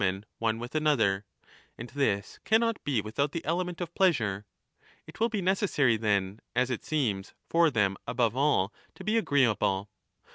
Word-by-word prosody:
i2io^ - - +3
MAGNA 95 - +2
MORALIA 95 - -11 0.2
one 115 -1 0
with 120 +1 -7
another; 145 -11 +2 0.5
and 115 +1 -7
this 105 -8 -1
cannot 225 0 +2
be 130 -7 +1
without 125 +7 -2
the 165 - -4
element 175 +2 -1
of 170 -1 -5
pleasure. 110 - +1 0.6
It - - -13
will 230 +1 +2
be 210 -4 -2
necessary, 180 - +2
then, 105 -2 0 0.2
as 125 +1 +2
it 120 - -3
seems, 110 -11 -1
for 170 0 +4
5 150 - -1
them 100 -4 +2
above 115 -1 +1
all 130 -8 +2 0.2
to - - -10
be 215 +3 0
agreeable. 110 - +1
125 Hz, 180 wpm, -29 LUFS, 105-165 Hz, 0.6 s, for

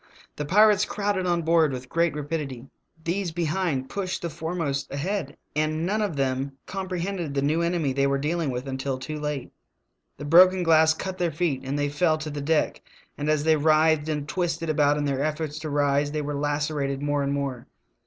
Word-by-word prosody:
The 150 - -4
pirates 210 +4 +5
crowded 200 -3 -1
on 175 -1 +1
board 160 -2 +3
with 130 -1 -6
great 165 +2 +1
rapidity; 145 -4 -4 0.4
these 180 +3 -1
behind 160 -4 -1
pushed 185 +1 -3
the 170 - -2
foremost 160 -3 -3
ahead, 155 +2 -3 0.2
and 155 +1 0
none 210 +4 0
of 200 -7 -1
them 135 0 -1
comprehended 185 -4 -3
the 140 - +1
new 155 +4 +2
enemy 170 -5 0
they 140 +1 +2
were 140 0 +1
dealing 155 +2 -1
with 125 +1 -4
until 130 0 -2
too 150 +4 -6
late. 150 -3 -4 0.7
The - - -7
broken 180 +4 +6
glass 160 -1 +5
cut 190 +2 -5
their 175 -1 +1
feet 150 -4 -1
and 135 +2 -2
they 145 0 +1
fell 155 +2 +2
to 155 -1 -5
the 145 0 -4
deck; 155 +2 +1 0.3
and 145 +1 -3
as 155 -1 +2
they 160 0 +4
writhed 155 0 +3
and 150 -2 -2
twisted 165 -2 -1
about 145 -1 +3
in 145 - -1
their 140 -1 0
efforts 155 0 -2
to 155 0 -5
rise 145 0 +1
they 155 - -1
were 145 0 -3
lacerated 145 -1 -1
more 145 0 +1
and 140 0 -1
more. 140 -4 -3
155 Hz, 195 wpm, -25 LUFS, 140-170 Hz, 0.7 s, broken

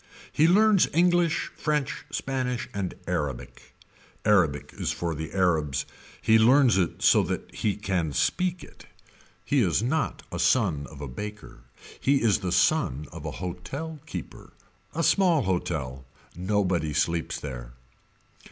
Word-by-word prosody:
He 155 - +4
learns 205 +2 +5
English 175 -1 +2
french 150 -3 -2
spanish 130 -3 -2
and 100 -3 -3
Arabic. 70 -4 -4 0.5
Arabic 85 -9 +2
is - - -2
for 85 -1 -2
the 80 +1 -5
Arabs. 80 -7 +1 0.4
He 110 0 +5
learns 125 -1 +5
it 90 - -1
so - - +6
that - - -4
he 105 -2 -1
can 95 -6 -1
speak 180 - 0
it. - - -15 0.6
He 140 - +2
is 95 0 +2
not 140 +6 -1
a - - -4
son 90 - +2
of 75 -2 -11
a 70 - -4
baker. 105 - -8 0.4
He 140 -1 +2
is 110 -2 +3
the 95 -3 -3
son 90 - +2
of - - -9
a - - -3
hotel 140 - -6
keeper. - - -8 0.4
A 165 - 0
small 175 -7 +3
hotel. 80 -9 -2 0.3
Nobody 90 -4 0
sleeps 85 +2 0
there. - - -7
100 Hz, 140 wpm, -26 LUFS, -, 0.6 s, so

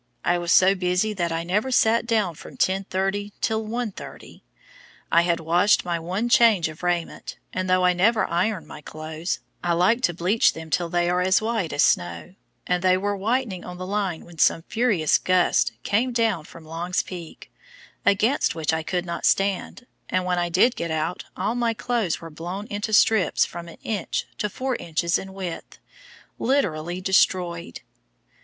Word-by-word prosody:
I 175 - +2
was 175 0 -2
so 190 +1 +6
busy 185 +3 0
that 175 -4 -2
I 165 0 -2
never 205 +9 0
sat 230 -2 +3
down 215 -7 +1
from - - -12
10:30 195 +1 -1
till 220 0 0
1:30. 225 -1 -6 0.7
I 170 - +6
had 170 -1 +1
washed 175 +6 +3
my 170 -1 -1
one 185 +8 -2
change 230 -8 +5
of 155 +1 -11
raiment, 175 -2 -3 0.2
and 185 0 -2
though 185 0 +3
I 180 - +4
never 215 +5 +3
iron 185 +2 -1
my - - -11
clothes, 155 +3 -5 0.2
I 175 -1 +1
like 185 +8 +3
to 175 - +1
bleach 185 +6 +3
them 160 -1 -9
till 170 +1 0
they 175 0 +1
are 180 +1 +1
as 185 +1 +3
white 220 -6 -2
as 145 - +2
snow, 85 - 0 0.3
and 180 0 0
they 185 0 +4
were 205 +2 -1
whitening 215 -2 -1
on 180 0 -8
the 185 - -6
line 195 -4 -2
when 170 -2 -14
some 165 - +3
furious 205 - +2
gusts 180 -9 +2
came 235 +5 +1
down 225 -9 0
from 165 0 -13
Long's 170 +3 -2
Peak, 175 -3 -10 0.5
against 205 +5 +2
which 160 -1 -1
I 160 - 0
could 180 +2 -2
not 170 -1 -5
stand, 195 +5 0 0.2
and 185 0 0
when 180 -1 0
I 175 0 0
did 195 +9 +3
get 170 - -3
out 160 +2 -2
all 215 - 0
my 235 -2 0
clothes 230 -8 -1
were 165 -1 -10
blown 175 +6 -6
into 205 +2 -3
strips 215 -1 +4
from 170 0 -8
an 170 - -11
inch 205 -6 -2
to 210 - -1
four 255 +5 -2
inches 170 +1 0
in 190 - -8
width, 185 -3 -7 0.6
literally 180 - 0
destroyed! 180 -2 +1
185 Hz, 180 wpm, -24 LUFS, 170-210 Hz, 0.7 s, so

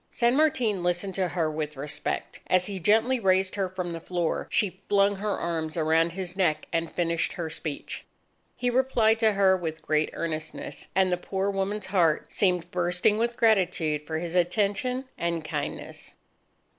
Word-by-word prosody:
San 235 +1 +2
Martin 250 - +2
listened 175 +2 -1
to 185 0 0
her 165 -3 -1
with 150 -1 -4
respect. 145 +2 -4
As 185 0 +3
he 195 -1 -4
gently 225 +8 +3
raised 190 -2 +2
her 195 -2 -1
from 180 -2 -4
the 165 - -5
floor, 175 -1 -2
she 190 -2 0
flung 200 0 +3
her 205 +1 -1
arms 160 -1 -2
around 165 +1 +2
his 185 -1 -5
neck 175 -6 +1
and 165 -1 0
finished 170 -1 0
her 165 -2 -4
speech. 155 -3 -5 0.5
He 245 0 0
replied 240 -3 +3
to 220 -2 +4
her 195 -1 +4
with 160 -3 -4
great 155 0 +1
earnestness; 155 -1 -5
and 190 -1 +3
the 180 - +2
poor 195 +2 -2
woman's 195 +1 -2
heart 175 -5 +1
seemed 180 -3 +1
bursting 180 +4 +2
with 235 +1 0
gratitude 175 -9 +2
for 160 - -2
his 170 +1 -4
attention 205 +8 +1
and 170 -2 -1
kindness. - - -5
180 Hz, 170 wpm, -27 LUFS, 165-205 Hz, 0.5 s, to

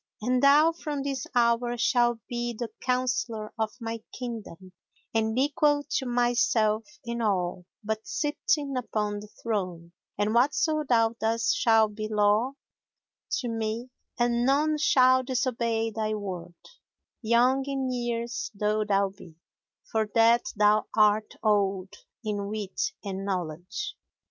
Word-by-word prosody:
And 250 +3 +1
thou, 295 +4 +6
from 300 -4 -4
this 275 -2 -3
hour, 240 0 +2
shalt 240 0 +2
be 240 -1 -3
the 235 -1 -4
counsellor 250 -4 -1
of 220 -1 +1
my 230 -1 -5
kingdom 220 -7 -7 0.4
and 220 0 0
equal 290 +1 +2
to 270 -3 0
myself 240 -2 +2 0.2
in 235 0 -3
all 180 -4 -1 0.2
but 220 +1 -3
sitting 295 -6 -1
upon 210 -4 -2
the 210 - -10
throne; 185 -7 -4 0.3
and 205 +1 +1
whatso 300 +5 +2
thou 230 -2 +4
dost 230 +5 +1
shall 225 -9 +4
be 215 +1 -5
law 215 +4 +2 0.9
to 250 - -4
me 225 +2 -3 0.3
and 240 -1 +1
none 300 +4 +2
shall 260 -3 +5
disobey 235 -3 -1
thy 215 0 -2
word, 185 -4 -6 0.7
young 245 +4 +3
in 270 -2 -1
years 235 -1 -3
though 210 +1 +1
thou 200 -1 +2
be, 190 -4 -15 0.6
for 220 -1 0
that 230 +1 +5
thou 210 +1 +3
art 215 0 +3
old 195 -3 +1 0.3
in 205 -2 -2
wit 215 - -3
and 195 -1 -4
knowledge. 185 - -4
230 Hz, 130 wpm, -27 LUFS, 210-255 Hz, 0.9 s, thou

